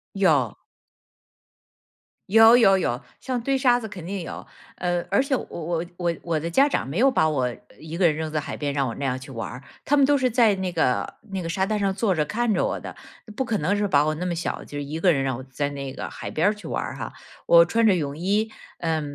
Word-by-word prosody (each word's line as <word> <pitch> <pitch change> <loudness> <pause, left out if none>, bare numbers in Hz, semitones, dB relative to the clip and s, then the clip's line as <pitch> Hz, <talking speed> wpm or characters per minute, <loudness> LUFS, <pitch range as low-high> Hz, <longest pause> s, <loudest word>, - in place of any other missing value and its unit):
有。 150 - +2 1.7
有 225 +3 +8
有 195 -6 +6
有， 125 -9 -1 0.2
像 255 -2 -3
堆 270 +3 +1
沙 245 -2 +4
子 220 -2 -7
肯 185 -5 -9
定 195 +1 -4
有。 165 - -7 0.3
呃， 175 -1 -1
而 200 - +3
且 275 -1 0
我 - - -3
我 170 0 -3
我 175 -2 -1
我 165 -2 -1
的 160 - -4
家 270 +12 +4
长 - - -1
没 150 +9 -3
有 270 +3 +6
把 210 - +2
我 130 -5 0 0.3
一 160 +1 -7
个 185 - +3
人 155 -3 +4
扔 160 0 -4
在 155 - 0
海 145 - -5
边 145 -1 -2
让 140 -1 0
我 115 - -3
那 - - -6
样 130 -1 -1
去 135 +1 -11
玩 115 -3 -5
儿， 125 +2 -9 0.2
他 290 - +2
们 280 - +6
都 290 +1 +4
是 260 -2 +2
在 230 -3 +4
那 190 -1 -3
个 160 -7 0 0.2
那 190 -1 -3
个 165 - -4
沙 190 +3 0
滩 215 +1 -1
上 200 -1 +1
坐 195 +1 +1
着 155 -3 +1
看 230 +7 0
着 - - +1
我 - - -1
的， - - -8 0.4
不 265 - 0
可 230 -4 -1
能 185 +6 0
是 205 0 0
把 145 -5 +3
我 155 - +1
那 175 +4 -3
么 175 - -1
小 170 - -3
就 145 - -8
一 145 +2 -4
个 180 +1 +4
人 135 -4 +1
让 135 -2 -1
我 130 - -8
在 140 +2 -2
那 140 -1 -6
个 - - -6
海 - - -7
边 165 +6 +2
儿 - - 0
去 210 - -11
玩 - - -2
儿 - - -6
哈。 - - -6 0.4
我 170 0 +8
穿 225 +6 +2
着 200 - +5
泳 145 -5 -2
衣， 205 +7 0 0.3
呃， 160 -2 -1
175 Hz, 275 characters per minute, -24 LUFS, 150-215 Hz, 1.7 s, 有